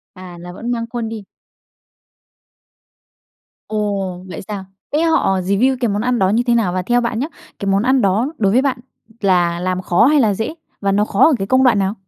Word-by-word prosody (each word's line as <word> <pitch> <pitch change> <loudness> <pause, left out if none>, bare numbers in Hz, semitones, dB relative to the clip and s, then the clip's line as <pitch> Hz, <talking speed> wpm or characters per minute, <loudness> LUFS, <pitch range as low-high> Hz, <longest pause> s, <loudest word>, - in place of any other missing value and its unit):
À, 185 -2 -10
là 175 +1 -9
vẫn 230 +6 -6
mang 230 -1 -2
khuôn 235 -2 -3
đi? 220 -2 -7 2.4
Ồ, 200 -4 -3
vậy 170 - -7
sao? 200 -2 -5 0.3
Thế 305 - +2
họ 255 - +2
review 200 +8 +1
cái 240 - +1
món 205 0 -1
ăn 250 0 0
đó 190 - +2
như 220 +5 +2
thế 240 - +3
nào? 215 -6 +1
Và 185 0 -1
theo 240 +6 +2
bạn 235 -2 -2
nhớ 265 - -1 0.3
cái 200 - -5
món 195 +1 +2
ăn 260 +2 +3
đó 200 +3 +2
đối 195 -3 +2
với 255 +4 +4
bạn 270 -2 0 0.4
là 175 -3 +2
làm 185 0 -2
khó 180 +6 +3
hay 295 +1 +4
là 215 -5 +2
dễ? 225 +10 -3 0.3
Và 200 -1 0
nó 205 +1 +2
khó 205 -1 +3
ở 320 - +4
cái 195 - -3
công 260 +5 +3
đoạn 240 -5 +4
nào? 195 +1 0
210 Hz, 220 wpm, -18 LUFS, 190-240 Hz, 2.4 s, với